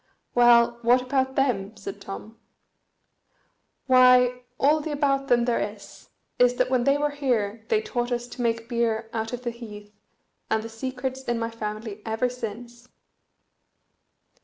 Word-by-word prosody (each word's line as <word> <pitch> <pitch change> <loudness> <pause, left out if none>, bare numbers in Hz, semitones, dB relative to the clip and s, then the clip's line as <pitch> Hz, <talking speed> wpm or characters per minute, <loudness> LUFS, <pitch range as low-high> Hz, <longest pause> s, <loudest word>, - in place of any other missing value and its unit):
"Well, 235 -1 +5
what 245 +2 +4
about 265 0 0
them?" 220 -6 0
said 200 -1 -8
Tom. 215 +3 -9 1.5
"Why, 250 -1 +5 0.2
all 300 +3 +4
the 310 - -5
about 275 -2 0
them 240 -2 +3
there 240 -1 +1
is, 205 -1 -7 0.3
is 245 0 +5
that 255 - 0
when 250 -2 +2
they 275 +1 +4
were 295 0 0
here 230 -7 -1
they 440 -1 +2
taught 245 - -2
us 240 0 -1
to 245 - -7
make 230 -1 -1
beer 230 -2 -1
out 225 0 -3
of 245 0 -5
the 240 - -2
heath, 210 -3 -11 0.6
and 220 - +1
the 225 - -7
secret's 260 +3 -4
in 240 -1 -1
my 230 0 -3
family 215 -1 -6
ever 225 +3 -1
since." 240 0 -8
240 Hz, 155 wpm, -25 LUFS, 225-255 Hz, 1.5 s, Well